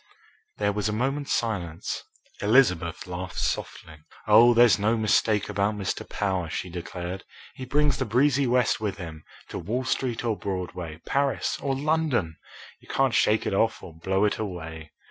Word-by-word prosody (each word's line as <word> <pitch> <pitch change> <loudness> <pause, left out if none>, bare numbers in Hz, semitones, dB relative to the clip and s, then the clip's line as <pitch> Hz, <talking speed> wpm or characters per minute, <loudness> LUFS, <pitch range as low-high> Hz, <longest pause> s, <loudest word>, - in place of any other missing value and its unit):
There 105 -1 +1
was 105 +1 -1
a - - -1
moment's 135 +5 -1
silence. 90 -8 -2 0.4
Elizabeth 90 -7 +3
laughed 90 0 -6
softly. 80 -1 -3 0.3
"Oh, 115 +3 +7
there's 120 -2 +6
no 110 +3 +2
mistake 110 -1 +2
about 105 +1 0
Mr. 100 -3 -4
Power!" 95 -5 -1
she 90 +2 -4
declared. 90 +1 -6 0.3
"He 130 - -7
brings 145 +3 +2
the 130 - -1
breezy 135 +4 +3
West 125 -3 +2
with 100 -4 -2
him, 80 -4 -8 0.3
to - - -5
Wall 115 +9 -2
Street 130 -2 -1
or 115 -2 +1
Broadway, 90 -5 -5
Paris 140 0 0
or 135 -1 0
London. 140 - 0 0.4
You - - -21
can't 135 -2 +1
shake 110 -1 +3
it - - -1
off 110 +3 +1
or 85 - -9
blow 95 +5 0
it 105 - 0
away." 80 -6 -6
105 Hz, 165 wpm, -26 LUFS, 90-125 Hz, 0.4 s, Oh